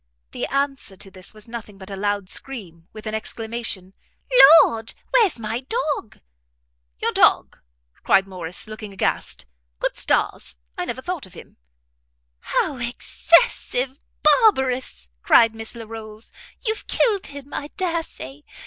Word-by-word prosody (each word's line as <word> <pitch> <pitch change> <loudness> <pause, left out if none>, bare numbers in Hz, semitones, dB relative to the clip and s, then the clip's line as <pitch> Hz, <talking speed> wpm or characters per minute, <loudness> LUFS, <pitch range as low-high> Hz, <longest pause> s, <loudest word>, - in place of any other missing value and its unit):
The - - -3
answer 275 -7 -2
to 195 +1 -9
this 185 -1 -11
was 215 0 -13
nothing 225 -3 -8
but 190 +1 -11
a - - -4
loud 205 0 -1
scream, 180 -10 -6
with 215 0 -11
an 215 - -4
exclamation, 220 -3 -3 0.7
"Lord, 225 0 -3 0.2
where's 440 - +4
my 225 +1 -3
dog?" 290 - -3 0.8
"Your - - 0
dog!" - - +3 0.4
cried 195 0 +3
Morrice, 180 -2 -4
looking 215 -1 -8
aghast, 190 - -2 0.3
"good - - -2
stars! 70 - 0 0.2
I - - -3
never 245 +5 -5
thought 355 - -4
of 185 - -17
him!" - - -13 0.8
"How 285 - -1
excessive 250 +2 +1 0.2
barbarous!" 265 - +3
cried 225 - +5
Miss 225 +1 -7
Larolles, 220 -1 -8 0.3
"you've 435 -1 -1
killed 415 -5 +1
him, 285 0 -10
I 290 - -3
dare 340 0 -1
say. 140 - -10
225 Hz, 135 wpm, -22 LUFS, 195-275 Hz, 0.8 s, cried